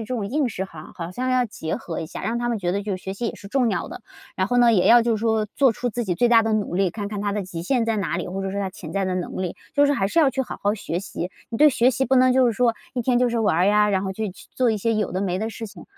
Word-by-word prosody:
这 255 Hz, -, -4 dB
种 210 Hz, -4 st, -2 dB
应 275 Hz, +3 st, 0 dB
试 190 Hz, -3 st, -4 dB
哈， 160 Hz, -4 st, -11 dB
好 170 Hz, 0 st, -6 dB
像 255 Hz, +5 st, -2 dB
要 255 Hz, -1 st, +3 dB
结 160 Hz, -6 st, -4 dB
合 165 Hz, -, -5 dB
一 160 Hz, -, -5 dB
下， -, -, -8 dB
让 225 Hz, +4 st, -1 dB
他 240 Hz, 0 st, -1 dB
们 230 Hz, -2 st, -1 dB
觉 175 Hz, -2 st, -1 dB
得 200 Hz, +1 st, -1 dB
就 200 Hz, -2 st, -2 dB
是 -, -, -14 dB
学 190 Hz, 0 st, -5 dB
习 235 Hz, +4 st, -3 dB
也 -, -, -6 dB
是 200 Hz, -, -12 dB
重 250 Hz, -1 st, +2 dB
要 195 Hz, -, -2 dB
的， 360 Hz, +4 st, -9 dB, 0.3 s
然 185 Hz, 0 st, +1 dB
后 245 Hz, -, +1 dB
呢， 240 Hz, -1 st, +6 dB
也 185 Hz, -4 st, +3 dB
要 240 Hz, +1 st, +8 dB
就 230 Hz, -1 st, +1 dB
是 215 Hz, -, -6 dB
说 220 Hz, -2 st, +1 dB
做 270 Hz, -5 st, +4 dB
出 245 Hz, +2 st, -3 dB
自 240 Hz, +1 st, -3 dB
己 180 Hz, -, -1 dB
最 240 Hz, +7 st, +2 dB
大 230 Hz, -1 st, +6 dB
的 225 Hz, -, 0 dB
努 210 Hz, -4 st, -1 dB
力， 190 Hz, -1 st, +2 dB
看 205 Hz, +1 st, -5 dB
看 205 Hz, -1 st, -4 dB
他 205 Hz, -, -1 dB
的 205 Hz, -1 st, -2 dB
极 175 Hz, -2 st, -6 dB
限 240 Hz, +5 st, +1 dB
在 225 Hz, -1 st, 0 dB
哪 200 Hz, -4 st, -1 dB
里， -, -, -3 dB
或 195 Hz, +2 st, -4 dB
者 195 Hz, -, -3 dB
是 200 Hz, -, -4 dB
他 195 Hz, -, -1 dB
潜 180 Hz, -4 st, -9 dB
在 195 Hz, 0 st, 0 dB
的 185 Hz, -, -1 dB
能 180 Hz, 0 st, -4 dB
力。 180 Hz, -, -4 dB, 0.2 s
就 285 Hz, 0 st, +5 dB
是 285 Hz, -, +2 dB
还 195 Hz, -8 st, +1 dB
是 270 Hz, -, 0 dB
要 305 Hz, -4 st, +6 dB
去 265 Hz, 0 st, -1 dB
好 -, -, -7 dB
好 205 Hz, +1 st, +2 dB
学 175 Hz, -4 st, -4 dB
习， 185 Hz, -2 st, -5 dB, 0.2 s
你 230 Hz, -, -4 dB
对 300 Hz, +2 st, +6 dB
学 250 Hz, 0 st, +3 dB
习 265 Hz, +1 st, 0 dB
不 265 Hz, -, +2 dB
能 255 Hz, 0 st, +5 dB
就 260 Hz, 0 st, +4 dB
是 235 Hz, -, +2 dB
说 235 Hz, +1 st, +2 dB, 0.2 s
一 250 Hz, -, 0 dB
天 245 Hz, +1 st, +2 dB
就 250 Hz, 0 st, +3 dB
是 235 Hz, -, -1 dB
玩 185 Hz, -4 st, +2 dB
呀， 210 Hz, 0 st, +4 dB
然 190 Hz, -1 st, +1 dB
后 190 Hz, -1 st, -3 dB
就 220 Hz, +3 st, -3 dB
去 185 Hz, -, -13 dB
做 250 Hz, -3 st, +2 dB
一 220 Hz, -, 0 dB
些 225 Hz, +3 st, 0 dB
有 215 Hz, -1 st, -1 dB
的 185 Hz, -, -1 dB
没 185 Hz, -2 st, -1 dB
的 220 Hz, +2 st, -2 dB
事 225 Hz, 0 st, -7 dB
情 195 Hz, -5 st, -12 dB
215 Hz, 370 characters per minute, -23 LUFS, 190-240 Hz, 0.3 s, 要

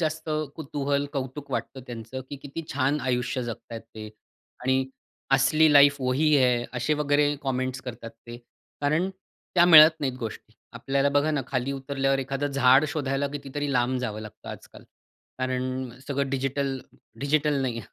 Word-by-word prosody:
जास्त 160 Hz, 0 st, -2 dB, 0.3 s
कुतूहल, 140 Hz, -2 st, -2 dB
कौतुक 135 Hz, +1 st, -5 dB
वाटतं 130 Hz, -, -3 dB
त्यांचं, 120 Hz, +1 st, -7 dB
की 145 Hz, -, -5 dB
किती 145 Hz, +3 st, -6 dB
छान 140 Hz, +2 st, +1 dB
आयुष्य 125 Hz, 0 st, -1 dB
जगताहेत 115 Hz, -1 st, -7 dB
ते. 110 Hz, -1 st, -10 dB, 0.6 s
आणि 130 Hz, +1 st, +2 dB, 0.5 s
असली 155 Hz, +3 st, +4 dB
लाईफ 140 Hz, 0 st, +7 dB
वही 130 Hz, +4 st, +2 dB
है 125 Hz, -3 st, +3 dB
असे 125 Hz, +5 st, 0 dB
वगैरे 145 Hz, 0 st, +2 dB
कमेंट्स 130 Hz, -1 st, -2 dB
करतात 115 Hz, -2 st, -7 dB, 0.2 s
ते, 120 Hz, -, -8 dB, 0.4 s
कारण 155 Hz, +6 st, +1 dB, 0.5 s
त्या 175 Hz, -, +6 dB
मिळत 160 Hz, -1 st, +9 dB
नाहीत 135 Hz, -3 st, -1 dB
गोष्टी. 110 Hz, -1 st, -7 dB, 0.2 s
आपल्याला 135 Hz, +4 st, 0 dB
बघा 145 Hz, +2 st, +2 dB
ना, 150 Hz, -2 st, 0 dB
खाली 135 Hz, 0 st, -2 dB
उतरल्यावर 135 Hz, 0 st, -1 dB
एखादं 135 Hz, +2 st, -2 dB
झाड 135 Hz, +1 st, +5 dB
शोधायला 140 Hz, -2 st, -1 dB
कितीतरी 145 Hz, 0 st, -4 dB
लांब 125 Hz, +1 st, +1 dB
जावं 110 Hz, -4 st, -4 dB
लागतं 110 Hz, -1 st, -11 dB
आजकाल. -, -, -11 dB, 0.5 s
कारण 130 Hz, 0 st, -2 dB, 0.2 s
सगळं 140 Hz, -1 st, -1 dB
डिजिटल, 135 Hz, 0 st, -1 dB, 0.4 s
डिजिटल 145 Hz, 0 st, +1 dB
नाही, 120 Hz, -3 st, -2 dB
135 Hz, 145 wpm, -26 LUFS, 130-145 Hz, 0.6 s, मिळत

